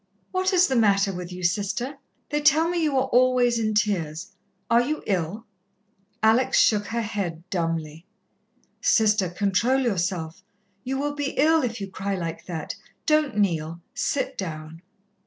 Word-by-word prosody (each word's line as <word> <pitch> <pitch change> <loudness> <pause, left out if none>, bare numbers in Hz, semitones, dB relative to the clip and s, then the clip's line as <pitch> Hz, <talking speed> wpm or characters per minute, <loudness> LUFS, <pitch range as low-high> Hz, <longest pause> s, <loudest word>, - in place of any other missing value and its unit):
"What 370 +1 +1
is 365 -1 +5
the 265 - -1
matter 200 -3 +3
with 180 0 -6
you, 180 0 -7
Sister? 210 +10 -1 0.3
They 295 0 0
tell 310 +2 +4
me 345 0 -1
you 300 -4 +1
are 260 - +2
always 245 -1 +3
in 215 -1 0
tears. 190 -4 -1 0.4
Are 235 +1 +4
you 300 +5 -2
ill?" 195 +3 -2 0.8
Alex 225 +4 +4
shook 205 -2 +3
her 235 0 -2
head 185 -6 -4
dumbly. 165 -2 -3 0.7
"Sister, 210 -4 +3
control 205 +8 +1
yourself. 180 -6 -2 0.4
You 265 +1 -2
will 290 +1 -1
be 290 -1 -3
ill 320 +2 +4
if 235 -3 -3
you 195 - -4
cry 195 +1 -3
like 165 -3 -5
that. 165 -3 -4 0.3
Don't 305 -7 +2
kneel, 170 -5 0
sit 285 - -2
down." 160 -2 -6
210 Hz, 155 wpm, -25 LUFS, 180-260 Hz, 0.8 s, is